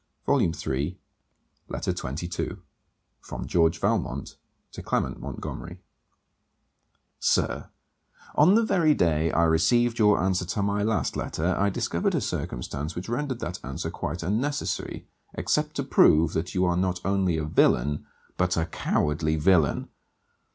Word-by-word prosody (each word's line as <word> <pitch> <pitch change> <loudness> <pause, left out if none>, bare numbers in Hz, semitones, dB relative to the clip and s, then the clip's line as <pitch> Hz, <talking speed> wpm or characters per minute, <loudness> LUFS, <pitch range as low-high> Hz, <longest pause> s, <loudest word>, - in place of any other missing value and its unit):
CAROLINE 80 - +2
ASHBURN 75 +3 -2 0.7
LETTER - - -2
XXII 85 +7 -4 0.6
FROM - - -7
GEORGE 80 -1 +2
VALMONT - - -1 0.4
TO - - -8
CLEMENT - - -1
MONTGOMERY 85 +1 -6 1.4
Sir, - - +1 0.6
On 170 +7 +5
the 230 - +4
very 165 -8 +3
day 80 -2 +2
I 85 - +3
received 115 +9 +3
your 105 -2 +5
answer 95 0 +1
to 95 +3 -2
my 100 0 0
last 110 +1 0
letter, 85 +4 -1
I 100 +1 +2
discovered - - -1
a - - +1
circumstance 75 +4 -4
which 90 +5 -5
rendered 130 0 -2
that 90 +2 -4
answer 65 0 -4
quite 85 +4 -4
unnecessary, 130 - -2 0.3
except - - 0
to - - -1
prove 80 0 +4
that 80 - -3
you 90 0 +3
are 90 -1 +2
not 90 -1 0
only 95 -3 +1
a 80 - -2
villain 75 -1 +2 0.3
but 90 -1 +1
a 80 - +1
cowardly 80 -1 0
villain. 80 -1 +3
90 Hz, 135 wpm, -26 LUFS, 80-100 Hz, 1.4 s, On